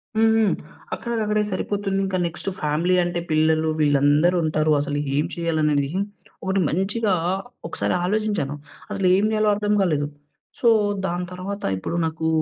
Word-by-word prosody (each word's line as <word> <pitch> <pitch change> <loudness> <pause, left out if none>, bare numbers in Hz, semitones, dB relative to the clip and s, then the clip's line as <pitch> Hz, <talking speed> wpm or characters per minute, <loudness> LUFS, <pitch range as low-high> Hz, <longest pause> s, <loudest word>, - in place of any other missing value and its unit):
హ్మ్, 220 0 +4
హ్మ్. 200 -6 +3 0.4
అక్కడికక్కడే 215 -3 -1
సరిపోతుంది. 195 +1 -1
ఇంకా 190 -1 -1
నెక్స్టు 170 +3 -4
ఫ్యామిలీ 155 +5 +1
అంటే 175 0 -2
పిల్లలు, 155 0 +3
వీళ్ళందరుంటారు, 155 +2 +3
అసలు 145 0 -2 0.2
ఏం 150 - +2
చేయాలనేడిది, 155 -4 +1 0.5
ఒకటి 190 +1 0
మంచిగా 200 +4 0 0.5
ఒకసారి 165 - -1
ఆలోచించాను. 205 -8 -1 0.4
అసలేం 190 +1 +3
జేయాలో 215 -1 +2
అర్థం 210 0 0
గాలేదు. 150 -6 +1 0.5
సో, 240 - +2 0.4
దాంతర్వాత, 180 +3 -4
ఇప్పుడు 95 - -4
నాకు 160 0 -2
175 Hz, 120 wpm, -23 LUFS, 155-200 Hz, 0.5 s, హ్మ్